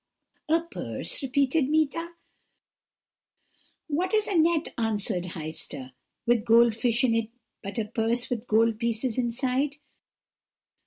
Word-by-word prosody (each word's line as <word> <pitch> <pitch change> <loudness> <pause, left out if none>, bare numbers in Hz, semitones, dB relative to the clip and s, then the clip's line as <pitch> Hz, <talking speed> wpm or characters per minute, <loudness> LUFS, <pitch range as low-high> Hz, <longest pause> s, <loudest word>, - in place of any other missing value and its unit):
"'A 325 +1 +4
purse?' - - -2
repeated 275 +1 +1
Meeta. 315 +2 0 1.7
"'What 355 +6 0
is 430 -1 +3
a - - -3
net,' 330 -1 +2
answered 210 -5 -1
Heister, 155 -4 -7 0.3
'with 235 -2 +3
gold 230 0 +5
fish 235 +2 +2
in 245 -3 +3
it 225 -1 0 0.3
but 200 +4 -6
a 225 - 0
purse 230 +2 0
with 245 0 -3
gold 225 0 +3
pieces 235 +1 -1
inside?' 255 +4 0
240 Hz, 120 wpm, -27 LUFS, 225-290 Hz, 1.7 s, gold